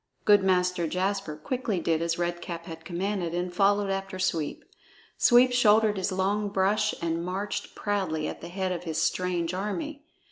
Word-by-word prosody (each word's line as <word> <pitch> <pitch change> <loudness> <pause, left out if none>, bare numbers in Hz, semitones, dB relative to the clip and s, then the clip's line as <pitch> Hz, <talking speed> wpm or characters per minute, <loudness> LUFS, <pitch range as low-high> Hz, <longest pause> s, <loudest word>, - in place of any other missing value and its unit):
Good 205 -1 +6
Master 180 -2 +2
Jasper 190 -1 -1
quickly 220 - -2
did 165 -1 0
as 170 0 0
Red 175 0 -2
Cap 170 -1 -6
had 165 -1 -9
commanded 175 0 -2
and 175 0 -2
followed 200 +1 +2
after 195 0 -3
Sweep. 165 -5 -2 0.5
Sweep 245 +1 +6
shouldered 220 -3 +4
his 190 +1 -1
long 200 +2 0
brush 205 +2 +1
and 165 0 -1
marched 190 +3 -4
proudly 185 -7 -1
at - - -6
the 170 - -7
head 185 +1 -2
of 180 0 -4
his 160 -1 -2
strange 175 +1 0
army. 275 - -4
185 Hz, 170 wpm, -27 LUFS, 170-205 Hz, 0.5 s, Good